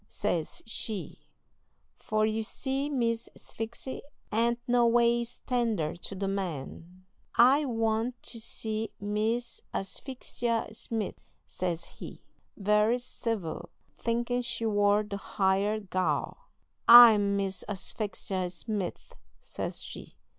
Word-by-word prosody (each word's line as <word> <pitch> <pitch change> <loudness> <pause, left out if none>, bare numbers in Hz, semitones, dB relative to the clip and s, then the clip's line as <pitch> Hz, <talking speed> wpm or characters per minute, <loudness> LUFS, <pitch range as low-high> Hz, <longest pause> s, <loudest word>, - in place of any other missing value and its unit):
says 175 -6 -2
she; 220 -2 -4 0.7
for, 215 0 0
you 220 +1 0
see, 270 +5 -2
Miss 235 -4 0
Sphyxy 230 +4 -6 0.3
ain't 235 +2 +2
no 240 -1 +4
ways 235 0 +2
tender 225 -11 0
to 180 +3 -7
the 195 +1 -2
men. 180 -1 -5 0.3
"'I 270 +5 +6
want 225 0 -1
to 230 - -5
see 220 -1 -2
Miss 220 +4 -1
Asphyxia 235 +2 -2
Smith,' 220 -1 -4 0.2
says 175 -2 -3
he, - - -11 0.3
very 210 +3 +3
civil, 225 -8 -4 0.3
thinking 240 +1 0
she 240 -2 -3
war 205 -1 +3
the 205 -1 -5
hired 200 +1 0
gal. 185 - -1 0.4
"'I'm 215 -4 +9
Miss 195 -1 -2
Asphyxia 195 -2 -3
Smith,' 200 0 -5 0.3
says - - -5
she. - - -10
220 Hz, 110 wpm, -29 LUFS, 200-235 Hz, 0.7 s, I'm